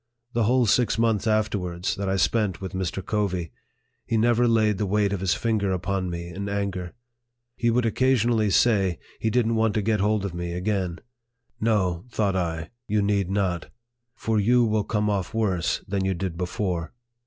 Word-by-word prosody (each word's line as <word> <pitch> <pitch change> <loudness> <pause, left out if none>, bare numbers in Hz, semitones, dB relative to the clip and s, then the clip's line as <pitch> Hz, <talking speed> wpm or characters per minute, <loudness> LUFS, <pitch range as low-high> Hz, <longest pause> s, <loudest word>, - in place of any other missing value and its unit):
The 115 -2 +2
whole 125 +2 +3
six 110 0 +2
months 115 -2 +1
afterwards, 100 -5 0
that 100 -1 -3
I 95 - +1
spent 100 -1 +1
with 95 -1 -5
Mr. 95 0 -3
Covey, 95 -5 -1 0.5
he 115 - -1
never 120 +2 +3
laid 110 -3 +2
the 105 - 0
weight 100 0 +1
of 100 - -2
his 95 -1 +1
finger 110 -4 0
upon 95 0 -1
me 85 0 -5
in 100 +3 -5
anger. 100 -2 -3 0.6
He 120 - +1
would 120 +1 +2
occasionally 115 -2 +2
say, 95 -4 +3 0.2
he 110 - 0
didn't 115 -1 +1
want 110 -2 +2
to 105 - +1
get 110 0 +1
hold 105 0 +1
of 95 - -4
me 85 0 -4
again. 90 -2 -2 0.3
" - - -55 0.3
No," 95 -5 +1
thought 100 -5 0
I, 80 -3 -2
" 120 - -57
you 105 0 +1
need 100 -2 +1
not; 95 -4 -1 0.5
for 110 -3 0
you 120 +4 +4
will 110 -2 +1
come 105 -1 0
off 100 0 -1
worse 95 -7 0
than 95 0 -1
you 95 0 0
did 90 -1 -3
before." 90 -1 -3
100 Hz, 190 wpm, -25 LUFS, 95-110 Hz, 0.6 s, you